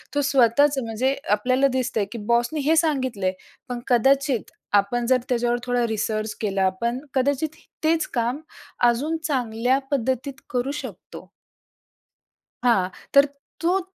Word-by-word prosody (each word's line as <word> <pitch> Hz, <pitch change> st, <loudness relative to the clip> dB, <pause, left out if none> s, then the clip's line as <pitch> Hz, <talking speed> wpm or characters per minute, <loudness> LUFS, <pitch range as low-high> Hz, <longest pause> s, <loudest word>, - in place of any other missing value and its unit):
तो 290 Hz, -, +3 dB
स्वतःच, 275 Hz, +1 st, +4 dB
म्हणजे 245 Hz, +5 st, 0 dB, 0.2 s
आपल्याला 255 Hz, +6 st, +3 dB
दिसतंय 235 Hz, -5 st, 0 dB
की 235 Hz, -, -5 dB
बॉसने 240 Hz, +6 st, +1 dB
हे 325 Hz, -, +5 dB
सांगितलंय, 260 Hz, -, +1 dB, 0.4 s
पण 245 Hz, -1 st, -3 dB
कदाचित 270 Hz, 0 st, +2 dB, 0.3 s
आपण 240 Hz, +4 st, -3 dB
जर 255 Hz, 0 st, +5 dB
त्याच्यावर 240 Hz, 0 st, +1 dB
थोडा 245 Hz, -1 st, +1 dB
रिसर्च 215 Hz, 0 st, -2 dB
केला, 195 Hz, -2 st, +1 dB
पण 235 Hz, +2 st, 0 dB
कदाचित 285 Hz, +4 st, 0 dB, 0.3 s
तेच 320 Hz, 0 st, +2 dB
काम 240 Hz, +3 st, 0 dB, 0.5 s
अजून 295 Hz, +8 st, 0 dB
चांगल्या 250 Hz, -1 st, +1 dB
पद्धतीत 260 Hz, +1 st, -1 dB, 0.2 s
करू 255 Hz, +2 st, -1 dB
शकतो. 210 Hz, -9 st, -10 dB, 1.3 s
हां, 195 Hz, -7 st, +3 dB, 0.2 s
तर 280 Hz, +1 st, +7 dB, 0.3 s
तो, 360 Hz, +3 st, +2 dB
250 Hz, 125 wpm, -23 LUFS, 230-275 Hz, 1.3 s, तर